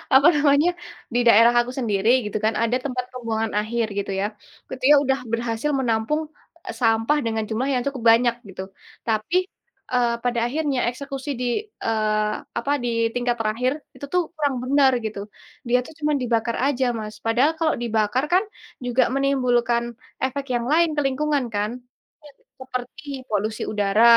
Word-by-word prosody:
apa 275 +2 +7
namanya, 290 +3 +4 0.4
di 240 - +2
daerah 230 +1 +7
aku 240 - -5
sendiri 210 -3 +1 0.2
gitu 210 - -2
kan 220 - +2
ada 240 +2 +2
tempat 250 -2 -2
pembuangan 225 -3 -2
akhir 230 +2 -1
gitu 200 0 -2
ya. - - +1 0.4
Ketika 260 +3 +4
udah 265 0 +1
berhasil 230 +3 -1
menampung 240 +5 0 0.6
sampah 225 +5 +3
dengan 220 -1 -1
jumlah 245 +5 -1
yang 250 -1 0
cukup 270 -4 -4
banyak 235 0 +1
gitu 190 0 -6 0.4
tapi, 220 +10 0 0.6
eee, 240 -2 +2
pada 245 -1 0
akhirnya 285 0 -1
eksekusi 275 +2 -6
di - - -1 0.4
eee, 215 -1 +1 0.3
apa 255 +5 -2
di - - -1 0.3
tingkat 245 -1 0
terakhir 225 +4 0 0.2
itu 285 - -7
tuh 360 - +4
kurang 285 -4 0
bener 270 0 +4
gitu, 210 -2 -4 0.5
dia 245 +1 +4
tuh - - -11
cuma 300 0 +1
dibakar 235 -1 0
aja, 265 -2 +1
Mas. 215 0 -6
Padahal 245 +7 +3
kalau 320 -2 +2
dibakar 225 +2 +1
kan 370 +3 +5 0.4
juga 245 +1 +3
menimbulkan 245 -4 +2 0.4
efek 270 +1 -1
yang 235 - -1
lain 335 +2 +4
ke - - +3
lingkungan 285 0 0
kan, 210 +1 0 0.5
iya 295 - -14 0.3
seperti 260 +3 -6 0.3
polusi 215 +1 -1
udara 205 +1 +2
245 Hz, 155 wpm, -23 LUFS, 225-275 Hz, 0.6 s, apa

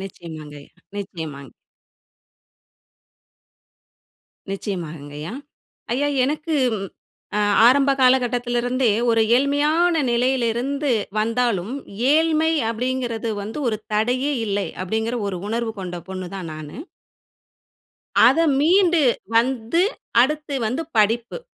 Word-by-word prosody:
நிச்சயமாங்கய்யா, 155 -6 -10
நிச்சயமாங்க. 160 - -7 3.0
நிச்சயமாங்கய்யா. 160 -5 -6 0.6
ஐயா, 285 +4 +1 0.2
எனக்கு 310 +3 -2 0.2
ம் 195 -1 -4 0.5
அ - - +2 0.3
ஆரம்ப 275 +3 +5
காலகட்டத்துல 245 -1 +2
இருந்தே 250 -1 +1 0.2
ஒரு 225 -1 +3
ஏழ்மையான 300 +5 +2
நிலையில 250 +1 +1
இருந்து 275 +3 -1 0.3
வந்தாலும், 230 -2 0 0.4
ஏழ்மை 320 0 +3 0.2
அப்பிடிங்கிறது 235 -1 -2
வந்து 220 +7 -6
ஒரு 215 - -1 0.2
தடையே 250 +6 +1
இல்லை. 200 -1 -1 0.2
அப்பிடிங்கிற 220 +5 -2
ஒரு 185 -2 -4
உணர்வு 230 0 -2
கொண்ட 180 -1 -5
பொண்ணு 185 -1 -5
தான் 185 -4 -6
நானு. 155 -1 -9 1.5
அத - - +5 0.2
மீண்டு 345 +2 +4 0.4
வந்து, 245 +6 +2 0.4
அடுத்து 300 +2 -1
வந்து 255 +9 -2 0.2
படிப்பு. 230 - +1
235 Hz, 95 wpm, -22 LUFS, 195-275 Hz, 3.0 s, ஆரம்ப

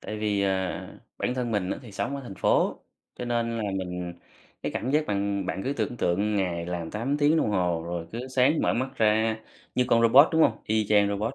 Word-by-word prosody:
Tại 105 - -6
vì, 105 -2 0
à, 95 -2 -1 0.3
bản 125 - -1
thân 125 -2 -2
mình 100 -4 -1
á - - -2
thì 115 - -12
sống 140 +7 -2
ở 140 - -7
thành 110 -6 -8
phố, - - +1 0.3
cho 125 - -6
nên 115 -1 -1
là 115 - -2
mình 90 -2 -4 0.5
cái - - -3
cảm 125 - -2
giác 150 +2 +2
bạn 100 -1 -1
bạn 95 - -3
cứ 135 - 0
tưởng 120 -3 -3
tượng 100 +4 0
ngày 85 -3 -1
làm 85 -2 -4
8 125 +7 -1
tiếng 150 +2 +4
đồng 110 - +1
hồ 90 -4 0
rồi 85 -1 -4
cứ 125 +3 -5
sáng 130 +4 +3
mở - - +2
mắt 130 +2 -1
ra 110 0 +2 0.4
như 125 - +2
con 115 0 +4
robot, 130 +7 +7
đúng 160 0 +4
hông? 110 - +3
Y 110 -1 +1
chang 105 -1 +4
robot, 105 +5 -2
110 Hz, 235 wpm, -26 LUFS, 95-125 Hz, 0.5 s, robot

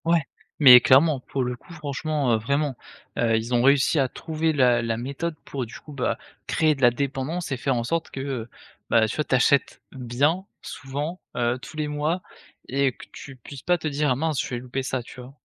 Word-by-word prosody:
Ouais! 170 0 +3 0.4
Mais 130 -4 +10
clairement. 140 +3 +5
Pour 135 +1 -3
le 125 0 -2
coup 170 - -15
franchement, 150 -3 -1
heu, - - +4
vraiment, 140 +5 -1 0.4
heu, 115 -2 +3
ils 115 +3 -3
ont 120 - +3
réussi 140 +4 +4
à 135 - +3
trouver 160 +4 -2
la 125 -4 +4
la 115 -1 -2
méthode 140 +7 -4
pour 135 -3 -4
du 115 - -10
coup, 150 - -12
bah, 140 - -1 0.3
créer 155 -1 +2
de 135 - -11
la 120 - +7
dépendance 140 +6 -3
et 135 - -1
faire 135 +1 0
en 120 - -1
sorte 165 +7 -2
que, - - -7
heu, 130 -4 -4 0.4
bah, 115 -1 +4
tu 110 - -4
vois, 150 - 0
tu - - +1
achètes 140 +2 +2
bien, 135 +9 0 0.2
souvent, 145 +7 -5 0.2
heu, 120 +1 0
tous 130 +5 -11
les 155 -1 -1
mois 150 +4 -1 0.5
et 135 0 +1
que - - -13
tu 135 - -10
puisses 130 +1 -11
pas 180 0 +2
te 160 - -4
dire: 145 -2 +1
«Mince 155 -1 0
je - - -5
vais 120 - -3
louper 125 +2 -4
ça». 130 -1 -2
Tu 125 - -11
vois? 125 +2 -12
135 Hz, 220 wpm, -24 LUFS, 125-150 Hz, 0.5 s, Mais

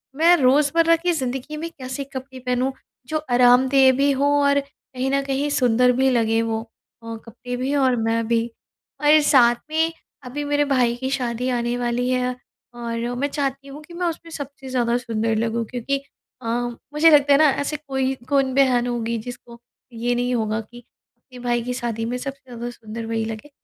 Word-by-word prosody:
मैं 335 +3 +6
रोज़मर्रा 300 +5 +4
की 350 +2 0
ज़िंदगी 270 +1 -3
में 335 +2 -4
कैसे 260 0 -6
कपड़े 260 0 -7
पहनूँ 250 +1 0 0.4
जो 310 - -1
आरामदेह 260 +2 +5
भी 280 0 +3
हों 280 +1 +1 0.2
और 280 0 +4
कहीं 270 -1 -6
न 275 0 +2
कहीं 275 +2 -1
सुंदर 250 -2 +3
भी 265 0 +3
लगें 225 -2 +2
वो 225 -1 -2 0.4
अ, 230 0 -6
कपड़े 245 +2 -7
भी 270 +3 -1
और 260 -3 +3
मैं 225 0 0
भी। 230 0 +1 0.5
और 300 +1 +6
साथ 240 -4 +5
में 320 +1 +1 0.3
अभी 275 +4 -5
मेरे 290 0 +1
भाई 250 -4 +2
की 260 +2 -4
शादी 250 -1 -2
आने 240 -1 -1
वाली 245 +1 -1
है 250 0 0 0.4
और 235 0 -4
मैं 285 - +1
चाहती 275 -1 -3
हूँ 285 +2 -9
कि 340 - -14
मैं 350 0 -1
उसमें 330 0 -5
सबसे 280 -3 -8
ज़्यादा 240 -2 +1
सुंदर 225 -2 -1
लगूँ 230 +1 -1
क्योंकि 250 +3 -2 0.4
अ, - - -11 0.5
मुझे 320 +2 +6
लगता 285 -1 +6
है - - +6
ना, 305 -2 +6
ऐसे 285 +2 -2
कोई 265 0 0 0.2
कौन 270 -2 +2
बहन 250 -3 +3
होगी 235 -1 -2
जिसको 235 +1 -9 0.3
ये 240 +2 -1
नहीं 245 0 0
होगा 220 -1 -1
कि 240 +3 -14 0.4
अपने 250 +1 -15
भाई 240 -1 0
की 250 0 -3
शादी 230 -2 -3
में 245 +2 -2
सबसे 275 +1 -6
ज़्यादा 240 0 -5
सुंदर 230 -1 -8
वही 225 -1 -2
लगे। 225 +6 -7
255 Hz, 190 wpm, -22 LUFS, 235-280 Hz, 0.5 s, मैं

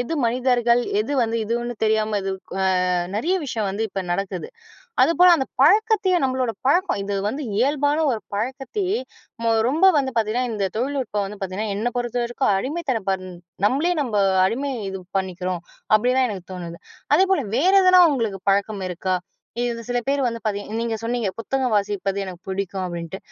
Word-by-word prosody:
எது 245 +7 -3
மனிதர்கள் 245 0 +2 0.2
எது 290 - -2
வந்து 230 -1 0
இதுன்னு 240 +2 -2
தெரியாம 215 -1 +2
இது 195 - -2 0.3
அ - - +1 0.5
நிறைய 320 - +1
விஷயம் 230 -7 -2
வந்து 200 +3 -2
இப்போ 195 - -4
நடக்குது 195 - -2 0.5
அதுபோல் 340 +6 +6
அந்த 265 -5 -1 0.2
பழக்கத்தையே 405 +3 +4
நம்மளோட 255 -2 0 0.2
பழக்கம் 355 - +2
இது 200 0 -2
வந்து 275 +8 -3
இயல்பான 285 +4 +2
ஒரு 230 - -2 0.2
பழக்கத்தையே 270 - -2 0.4
ம 230 0 +3 0.2
ரொம்ப 320 +8 +3
வந்து 265 -2 0
பார்த்திங்கன்னா 230 +3 0
இந்த 205 -3 -1
தொழில்நுட்பம் 250 -5 -1
வந்து 205 +2 -8
பார்த்திங்கன்னா, 195 +3 -3
என்னை 235 +4 -1
பொறுத்த 245 0 -2
வரைக்கும் 240 -2 0
அடிமைத்தனம் 225 - -2 0.4
நம்மளே 305 +9 +1
நம்ம 240 -6 -2 0.3
அடிமை 275 +8 -1 0.2
இது 190 0 -5 0.2
பண்ணிக்கிறோம். 185 -1 -4 0.3
அப்படிதான் 250 +4 +3
எனக்கு 190 -4 -6
தோணுது. 170 -2 -7 0.4
அதேபோல 380 -4 +3 0.2
வேறு 370 +8 +4
எதனா 370 0 +7
உங்களுக்கு 225 -8 -1
பழக்கம் 200 0 0
இருக்கா? 185 +1 -1 0.5
இது 235 -1 -2
சில 245 0 0
பேர் 280 0 +1
வந்து 230 -1 -2
பார்த்திங்க 205 +1 -3
நீங்க 230 -1 -1
சொன்னீங்க 230 -3 -1
"புத்தகம் 255 +1 -1
வாசிப்பது 200 -1 0
எனக்கு 185 -2 -8
பிடிக்கும்." 190 0 -3
அப்படின்ட்டு 170 0 -5
235 Hz, 155 wpm, -22 LUFS, 200-270 Hz, 0.5 s, எதனா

